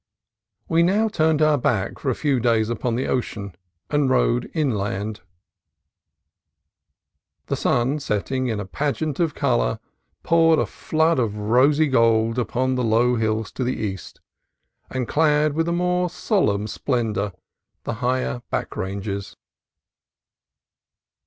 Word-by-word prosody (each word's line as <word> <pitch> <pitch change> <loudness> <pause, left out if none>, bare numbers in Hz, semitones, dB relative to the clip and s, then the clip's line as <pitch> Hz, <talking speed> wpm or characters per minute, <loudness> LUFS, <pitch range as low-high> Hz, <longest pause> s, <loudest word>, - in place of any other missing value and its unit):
We 165 -2 +3
now 205 +6 +3
turned 155 -5 +2
our 155 -2 +3
backs 105 -6 -1
for 140 - -1
a 125 - 0
few 140 -4 +1
days 115 -2 +2
upon 120 0 -1
the 130 - -1
ocean 105 -6 -3 0.4
and 145 -2 +2
rode 125 -1 +1
inland. 105 - -2 2.2
The - - -1
sun, 130 +5 +1
setting 130 +2 -2
in 110 -3 -2
a 105 - -4
pageant 145 +6 -2
of 165 -4 0
color, - - +1 0.5
poured 165 -1 +4
a - - +2
flood 160 -1 0
of 110 -4 0
rosy 130 +9 +3
gold 115 -3 +2
upon 130 +2 0
the 125 -1 -1
low 115 +2 +3
hills 110 -1 -1
to 130 - -3
the 125 +1 -1
east, 95 -4 -5 0.7
and 130 -2 -3
clad 150 -1 +2
with 165 +2 0
a - - 0
more 180 +1 +1
solemn 105 - 0
splen 115 0 -1
dor 100 -1 -2 0.5
the - - -3
higher 125 0 -1
back - - -3
ranges. 100 +1 -4
125 Hz, 135 wpm, -23 LUFS, 110-150 Hz, 2.2 s, poured